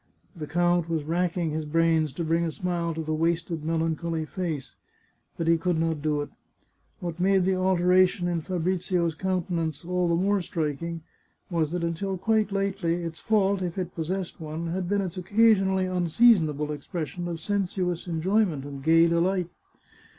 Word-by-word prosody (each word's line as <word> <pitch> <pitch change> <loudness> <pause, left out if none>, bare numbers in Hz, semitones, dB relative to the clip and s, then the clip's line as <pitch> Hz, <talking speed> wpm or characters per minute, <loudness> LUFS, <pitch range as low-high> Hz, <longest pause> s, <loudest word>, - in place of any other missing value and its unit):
The 155 -3 -6
count 175 +1 +1
was 160 -2 -1
rack 170 +3 -1
ing 165 -3 0
his 155 +1 -2
brains 160 0 +2
to 170 - -3
bring 165 +1 +1
a 170 - 0
smile 170 +2 -2
to 160 - -3
the 155 0 -2
wasted 165 0 -1
melancholy 165 0 -1
face. 155 -6 -4 0.6
But 165 - -2
he 165 0 +4
could 175 0 0
not 160 -2 0
do 150 -1 0
it. - - -10 0.7
What 170 -1 -5
made 190 0 +3
the 190 - +2
alteration 185 -1 +3
in 170 -2 -1
Fabrizio's 180 -1 0
countenance 170 -3 -2
all 180 0 0
the 170 - +3
more 195 +3 +2
striking 165 0 -3 0.5
was 165 -3 +1
that 175 +1 -3
until 185 +3 -2
quite 215 +2 +1
lately 195 -3 -1
its 165 -1 -5
fault, 200 -3 +2
if 175 -1 -3
it 180 -1 -3
possessed 175 +2 -4
one, 160 +2 -4
had 180 +1 -2
been 205 0 +2
its 185 -2 -4
occa 220 +5 +5
sionally 190 -1 0
unseasonable 165 -5 +3
expression 170 +4 -5
of 170 -1 -4
sensuous 180 -2 -1
enjoyment 170 -2 +1
and 140 -1 -7
gay 165 +3 +5
delight. 175 +1 +1
170 Hz, 170 wpm, -26 LUFS, 160-185 Hz, 0.7 s, occa